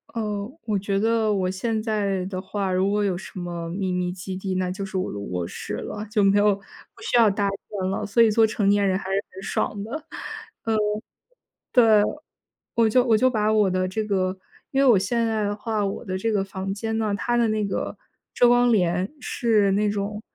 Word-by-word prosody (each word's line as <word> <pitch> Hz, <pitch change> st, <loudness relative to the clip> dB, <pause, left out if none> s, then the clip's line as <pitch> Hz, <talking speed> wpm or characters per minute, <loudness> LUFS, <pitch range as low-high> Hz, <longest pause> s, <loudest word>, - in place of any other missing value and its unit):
哦， 210 Hz, -2 st, -2 dB, 0.2 s
我 210 Hz, -3 st, 0 dB
觉 195 Hz, 0 st, -1 dB
得 220 Hz, -1 st, +2 dB
我 185 Hz, -2 st, 0 dB
现 215 Hz, +3 st, -1 dB
在 200 Hz, -4 st, -1 dB
的 185 Hz, -1 st, -4 dB
话 190 Hz, 0 st, -3 dB
如 185 Hz, +1 st, +2 dB
果 210 Hz, +1 st, +1 dB
有 190 Hz, -3 st, 0 dB
什 190 Hz, -, -8 dB
么 175 Hz, -1 st, -4 dB
秘 190 Hz, +1 st, -2 dB
密 180 Hz, 0 st, -1 dB
基 190 Hz, +1 st, -6 dB
地， 190 Hz, 0 st, -3 dB
那 185 Hz, -1 st, 0 dB
就 195 Hz, +2 st, -4 dB
是 195 Hz, -, -9 dB
我 185 Hz, -, -1 dB
的 -, -, -6 dB
卧 90 Hz, -4 st, -3 dB
室 -, -, -6 dB
了， 210 Hz, 0 st, -5 dB
就 210 Hz, -1 st, +1 dB
没 195 Hz, +1 st, +4 dB
有 205 Hz, 0 st, +5 dB
不 195 Hz, 0 st, -19 dB
需 430 Hz, -, +1 dB
要 230 Hz, -2 st, +6 dB
搭 200 Hz, 0 st, 0 dB
建 195 Hz, -1 st, -4 dB
了。 195 Hz, +2 st, -2 dB
所 210 Hz, +3 st, +3 dB
以 230 Hz, -, +6 dB
做 220 Hz, +1 st, +4 dB
成 210 Hz, -2 st, +1 dB
年 200 Hz, -1 st, +3 dB
人 185 Hz, -, +2 dB
还 -, -, -8 dB
是 195 Hz, +1 st, 0 dB
很 190 Hz, -, -9 dB
爽 200 Hz, 0 st, -2 dB
的， 220 Hz, -, -8 dB, 0.7 s
嗯， 225 Hz, -1 st, +1 dB
对。 210 Hz, +1 st, -1 dB, 1.7 s
我 230 Hz, -1 st, +4 dB
就 250 Hz, +3 st, +4 dB
我 230 Hz, -3 st, +4 dB
就 255 Hz, +4 st, +4 dB
把 215 Hz, -3 st, +1 dB
我 210 Hz, -3 st, +4 dB
的 185 Hz, 0 st, 0 dB
这 215 Hz, +4 st, -2 dB
个 190 Hz, -2 st, 0 dB, 0.3 s
因 270 Hz, 0 st, +2 dB
为 -, -, +4 dB
我 225 Hz, -5 st, +7 dB
现 230 Hz, +4 st, 0 dB
在 220 Hz, -1 st, 0 dB
的 205 Hz, -, -1 dB
话， 215 Hz, -1 st, -1 dB
我 195 Hz, -, -4 dB
的 185 Hz, -1 st, -3 dB
这 225 Hz, +4 st, -1 dB
个 200 Hz, -2 st, +1 dB
房 195 Hz, 0 st, -4 dB
间 220 Hz, +2 st, -3 dB
呢， 215 Hz, -2 st, 0 dB
它 240 Hz, +4 st, 0 dB
的 235 Hz, -1 st, +3 dB
那 215 Hz, -1 st, 0 dB
个 200 Hz, -, -3 dB, 0.4 s
遮 245 Hz, -, +5 dB
光 245 Hz, -1 st, +4 dB
帘 180 Hz, -, +1 dB
是 215 Hz, -6 st, +2 dB
那 210 Hz, +1 st, +2 dB
种 205 Hz, +1 st, -3 dB
205 Hz, 240 characters per minute, -24 LUFS, 190-220 Hz, 1.7 s, 我